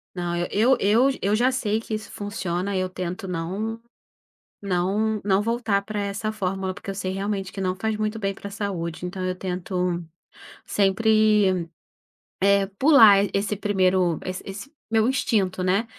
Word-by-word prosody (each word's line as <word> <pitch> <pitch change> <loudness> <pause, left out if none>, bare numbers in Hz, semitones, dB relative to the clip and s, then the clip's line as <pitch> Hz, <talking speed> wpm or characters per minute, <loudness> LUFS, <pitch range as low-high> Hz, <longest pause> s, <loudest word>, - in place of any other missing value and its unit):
Não, 175 -1 -2
eu 240 +5 +4
eu 225 +7 +4
eu 200 +2 +2
já 245 +4 +3
sei 220 -4 -1
que 225 - -5
isso 215 -1 -6
funciona, 195 -1 -3
eu 185 0 0
tento 180 +1 -5
não 190 +6 -3 0.8
não 200 +3 0
não 195 0 +2
voltar 225 -3 0
pra 210 0 -5
essa 200 +2 -2
fórmula, 190 -2 -2
porque 200 0 -9
eu 195 - -3
sei 185 -1 -3
realmente 195 -1 -3
que 195 - -8
não 185 -1 -1
faz 220 +2 -2
muito 215 +1 -2
bem 195 -2 -2
pra 200 - -8
saúde. 180 -5 -4
Então 185 +1 -5
eu 185 0 -1
tento 180 -1 -2 0.6
sempre, 205 -3 +3 0.7
eh, 200 0 +4
pular 230 -9 +8 0.2
esse 200 +1 -1
primeiro, 185 -4 +2
esse 185 0 -5
esse 200 +9 -8 0.2
meu 220 0 +3
instinto, 195 -8 0
né, 195 +5 +2
200 Hz, 160 wpm, -24 LUFS, 185-215 Hz, 0.8 s, pular